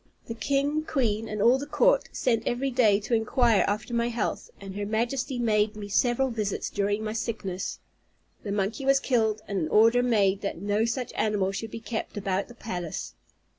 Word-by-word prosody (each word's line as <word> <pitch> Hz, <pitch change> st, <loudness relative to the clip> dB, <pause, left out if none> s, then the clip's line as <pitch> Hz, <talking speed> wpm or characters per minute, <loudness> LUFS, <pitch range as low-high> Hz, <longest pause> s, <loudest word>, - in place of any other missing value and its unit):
The 230 Hz, -, -5 dB
king, 280 Hz, +6 st, 0 dB
queen, 225 Hz, -7 st, -1 dB
and 210 Hz, -1 st, -2 dB
all 250 Hz, +3 st, +5 dB
the 285 Hz, -, -6 dB
court, -, -, +3 dB
sent 230 Hz, -3 st, 0 dB
every 265 Hz, +3 st, 0 dB
day 220 Hz, -5 st, +4 dB
to 215 Hz, -, -4 dB
inquire 230 Hz, -1 st, +3 dB
after 215 Hz, +4 st, -2 dB
my 235 Hz, 0 st, +1 dB
health, 230 Hz, -2 st, -3 dB
and 195 Hz, -1 st, -8 dB
her 205 Hz, -, -3 dB
Majesty 240 Hz, +5 st, -1 dB
made 215 Hz, -2 st, +1 dB
me 205 Hz, -1 st, -7 dB
several 245 Hz, +5 st, +2 dB
visits 210 Hz, -4 st, -2 dB
during 205 Hz, +1 st, 0 dB
my 215 Hz, 0 st, -3 dB
sickness. 210 Hz, -5 st, -3 dB, 0.6 s
The 205 Hz, -, -5 dB
monkey 205 Hz, +6 st, -1 dB
was 275 Hz, 0 st, +4 dB
killed, 220 Hz, -5 st, +1 dB
and 200 Hz, -2 st, -1 dB
an 155 Hz, -, -1 dB
order 225 Hz, +3 st, +5 dB
made 205 Hz, -5 st, +2 dB
that 200 Hz, -, -3 dB
no 205 Hz, +3 st, +1 dB
such 235 Hz, +1 st, -3 dB
animal 205 Hz, -3 st, 0 dB
should 210 Hz, +3 st, -5 dB
be 230 Hz, -, -7 dB
kept 225 Hz, -2 st, -5 dB
about 195 Hz, -1 st, -1 dB
the 240 Hz, -, -13 dB
palace. 175 Hz, -8 st, -5 dB
220 Hz, 190 wpm, -27 LUFS, 205-245 Hz, 0.6 s, all